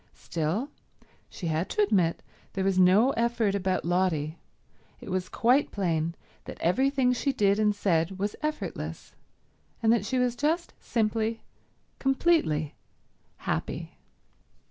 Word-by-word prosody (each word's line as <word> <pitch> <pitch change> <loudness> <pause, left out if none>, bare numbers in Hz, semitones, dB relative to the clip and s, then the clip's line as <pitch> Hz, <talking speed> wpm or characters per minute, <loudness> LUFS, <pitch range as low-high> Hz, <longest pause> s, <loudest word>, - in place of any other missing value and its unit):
Still, 175 - -2 0.6
she 180 - -8
had 160 +2 -1
to 210 - +2
admit 190 -5 +1 0.3
there 190 - -1
was 190 -1 +2
no 195 +8 +5
effort 235 -4 +1
about 190 -3 -1
Lotty; 170 -3 0 0.6
it - - -8
was 185 0 -2
quite 255 +5 +3
plain 170 -4 -1 0.3
that - - -8
everything 260 +7 +2
she 275 +3 0
did 200 -4 +2
and 210 -1 +3
said 185 -2 +1
was 205 +2 -2
effortless, 305 0 -4 0.7
and 225 0 +5
that 235 - +1
she 260 - 0
was 250 -1 +1
just 320 +6 0
simply, 225 0 -1 0.6
completely 270 - +2 0.6
happy. - - -3
205 Hz, 125 wpm, -28 LUFS, 180-245 Hz, 0.7 s, no